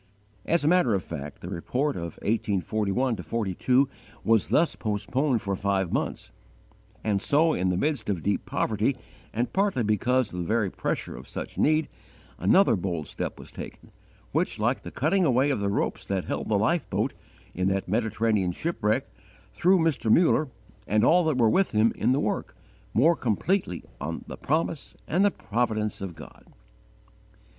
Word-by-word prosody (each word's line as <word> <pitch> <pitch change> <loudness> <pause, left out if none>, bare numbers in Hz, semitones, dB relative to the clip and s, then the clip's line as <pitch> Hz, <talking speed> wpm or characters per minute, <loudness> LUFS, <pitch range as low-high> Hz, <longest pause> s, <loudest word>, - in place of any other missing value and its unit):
As 170 -2 +2
a - - +2
matter 160 - +4
of 95 - -2
fact 75 -3 -7
the - - -7
report 130 - -1
of 85 -1 -6
1841 110 +3 0
2 115 - +1 0.3
was 115 -1 +3
thus 165 +1 +3
postponed 120 +4 -1
for 100 -1 -1
five 95 -2 0
months; - - -2 0.7
and 100 -3 +1
so, 155 +6 +3
in 90 +1 0
the 90 - 0
midst 140 -1 -1
of 90 -6 -1
deep 100 - 0
poverty 110 +5 0 0.3
and 120 +3 -2
partly 195 - +1
because 120 +2 +1
of 90 - -4
the 85 - -2
very 110 -4 +1
pressure - - -3
of 65 +3 -10
such - - -6
need, 155 0 +3 0.5
another 150 - +5
bold 85 -5 -3
step - - -5
was - - -12
taken, - - -10 0.4
which, - - 0
like - - 0
the - - -7
cutting 175 +7 +1
away 135 -1 +3
of 130 - 0
the 100 0 0
ropes 100 - -1
that 95 -2 -2
held - - -3
the 105 - +3
life 120 +12 +1
boat, - - 0 0.4
in 90 +1 0
that 95 0 0
Mediterranean 110 -2 +1
shipwreck, 115 - -1 0.5
threw 185 +2 +4
Mr. 160 -9 +1
Muller, 155 -2 +4 0.4
and 105 +1 +2
all 180 +2 +5
that 155 -5 +1
were 115 -3 +4
with 190 - +2
him 110 +2 +3
in - - +1
the 135 - +2
work, - - -2 0.4
more 160 +9 +5
completely 125 - -1 0.2
on - - -4
the - - -7
promise 155 0 -2
and 180 +4 +2
the 205 - +5
providence 110 - -2
of 95 -4 -5
God. 75 - -13
115 Hz, 170 wpm, -26 LUFS, 100-145 Hz, 0.7 s, another